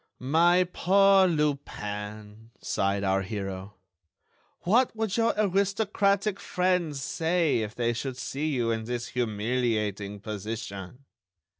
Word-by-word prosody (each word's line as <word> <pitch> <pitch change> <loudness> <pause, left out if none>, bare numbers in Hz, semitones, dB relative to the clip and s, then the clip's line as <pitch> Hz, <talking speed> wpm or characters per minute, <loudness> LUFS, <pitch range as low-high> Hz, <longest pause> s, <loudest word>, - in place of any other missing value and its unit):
"My 170 +7 +4
poor 195 +1 +5
Lupin," 110 - -3
sighed 100 +1 -1
our 95 0 +2
hero, 95 -1 -5 0.9
"what 230 +7 +2
would 220 -2 -1
your 230 0 +2
aristocratic 200 0 +1
friends 180 -5 0
say 165 -3 +1
if 110 -1 -4
they 120 -1 0
should 125 +2 -4
see 140 +4 -3
you 120 -6 0
in 110 -1 -2
this 120 0 -4
humiliating 105 -3 -1
position?" 105 +2 -6
125 Hz, 110 wpm, -27 LUFS, -, 0.9 s, poor